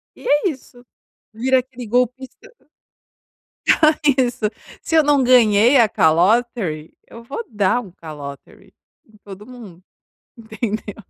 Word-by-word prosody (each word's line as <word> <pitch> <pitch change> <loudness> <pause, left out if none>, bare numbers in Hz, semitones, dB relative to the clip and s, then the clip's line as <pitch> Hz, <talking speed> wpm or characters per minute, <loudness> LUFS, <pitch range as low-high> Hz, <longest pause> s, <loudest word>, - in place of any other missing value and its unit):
e - - -16
é 295 +6 +2
isso, 250 -3 -12 0.5
vira 260 +4 +1
aquele 250 -1 -9
golpista 250 +3 -2 1.7
Isso, 245 -3 -1 0.4
se 325 - -2
eu 315 - +5
não 285 -2 +2
ganhei 240 0 +4
a 235 -3 +5
"calotery", 180 -1 0
eu 230 - -13
vou 275 - -6
dar 210 +2 0
um 195 - -13
"calotery" 145 -5 -11 0.3
em 215 -1 -23
todo 200 0 -12
mundo, 215 -8 -13 0.5
entendeu? 220 -2 -6
230 Hz, 120 wpm, -19 LUFS, 200-255 Hz, 1.7 s, eu